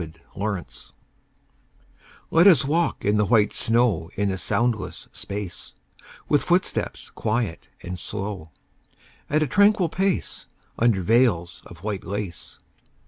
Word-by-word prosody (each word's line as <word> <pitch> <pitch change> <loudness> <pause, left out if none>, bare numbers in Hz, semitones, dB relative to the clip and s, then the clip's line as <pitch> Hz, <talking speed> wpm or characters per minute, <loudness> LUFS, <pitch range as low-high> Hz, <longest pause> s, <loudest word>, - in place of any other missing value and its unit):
VELVET 80 -1 -9
SHOES 100 -3 -5 1.4
Let 170 +4 +6
us 170 -7 +6
walk 165 +4 0
in 105 +1 +3
the 105 - +3
white 105 -1 +3
snow 115 -8 +1
In 100 0 0
a 95 - -3
soundless 115 -1 -1
space; 100 -3 -6 0.5
With 145 - +3
footsteps 180 +1 -1
quiet 110 -6 -2 0.2
and 90 0 -6
slow, 100 -4 -5 0.8
At 155 +1 +2
a - - -1
tranquil 200 - +4
pace, 190 0 -2 0.3
Under 110 -5 +3
veils 100 -6 +2
of 85 -1 -14
white 105 -3 -3
lace. 100 -3 -5
105 Hz, 125 wpm, -24 LUFS, 95-130 Hz, 1.4 s, Let